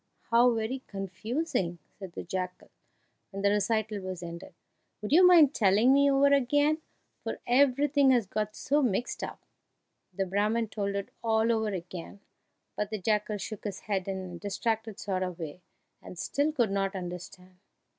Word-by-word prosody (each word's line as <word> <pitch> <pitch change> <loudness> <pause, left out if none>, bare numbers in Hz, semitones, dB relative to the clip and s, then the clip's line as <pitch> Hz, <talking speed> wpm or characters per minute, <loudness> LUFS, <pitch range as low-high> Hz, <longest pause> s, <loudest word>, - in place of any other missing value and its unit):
"How 240 +2 +6
very 230 +3 -2
confusing!" 195 - -3 0.2
said 190 -3 -8
the - - -6
jackal, 180 0 -5 0.6
when 195 -1 -6
the 200 - +4
recital 215 0 0
was 185 -2 -6
ended; 170 +1 -8 0.4
"would 210 - -6
you 345 +5 +7
mind 320 -6 +7
telling 215 +5 +4
me 280 0 +5
over 280 +1 +4
again, 290 +3 +3 0.4
for - - -3
everything 280 +2 +4
has 245 -4 +4
got 215 +2 -3
so 290 +2 +1
mixed 245 -2 -1
up?" - - -7 0.7
The 195 +1 -2
Brahman 210 +4 0
told 200 -2 -2
it 200 0 -3
all 225 0 +2
over 220 -1 +1
again, 180 0 -7 0.6
but 210 -1 -2
the 215 - -3
jackal 210 +1 0
shook 210 +1 -6
his 200 -3 -5
head 195 -3 -2
in 195 -1 -2
a 175 - -8
distracted 220 +2 -2
sort 190 -2 -2
of 180 -2 -3
way, 165 +1 -7 0.4
and 180 - -11
still 285 - 0
could 240 -9 +1
not 195 0 -1
understand. 180 0 -8
210 Hz, 165 wpm, -29 LUFS, 190-245 Hz, 0.7 s, you